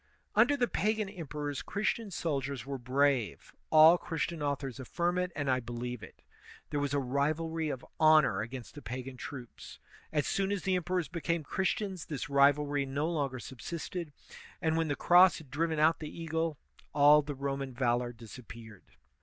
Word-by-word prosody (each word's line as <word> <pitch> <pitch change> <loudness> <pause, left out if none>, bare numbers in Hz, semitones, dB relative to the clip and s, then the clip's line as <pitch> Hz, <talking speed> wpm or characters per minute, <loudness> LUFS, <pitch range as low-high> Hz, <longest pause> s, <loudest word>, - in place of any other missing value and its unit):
Under 245 +7 +4
the 245 -2 +2
pagan 215 -1 0
emperors 150 -6 -5
Christian 215 +1 -2
soldiers 140 - -3
were 135 -1 -4
brave; 130 -2 0 0.2
al) 160 +2 +8
Christian 165 0 -3
authors 140 -3 -2
affirm 175 +7 -1
it, 180 0 -1
and 145 -1 -2
I 130 -1 +2
believe 120 0 -5
it. - - -13 0.5
There 145 - 0
was 145 0 -1
a - - +2
rivalry 155 +4 -1
of 130 -3 -5
honor 155 -10 +5
against 120 +2 -7
the 145 - -10
pagan 130 +1 -6
troops. 125 -1 -9 0.3
As 150 -2 +1
soon 195 0 0
as 200 -3 -2
the 190 -1 +1
emperors 180 -2 -1
became 170 0 -2
Christians, 190 +1 -2
this 145 -1 -5
rivalry 145 +1 +4
no 140 +3 -1
longer 145 -6 -1
subsisted; 165 +6 -6 0.5
and 160 -3 +1
when 165 0 +1
the 145 - 0
cross 180 +3 +6
had 150 -5 -13
driven 160 +2 0
out 155 +2 +4
the 155 - -6
eagle, 165 -1 -2 0.4
all 145 +1 +7
the 145 -1 -6
Roman 135 0 -3
valor 120 -1 0
disappeared. 115 -2 -12
145 Hz, 165 wpm, -31 LUFS, 135-165 Hz, 0.5 s, al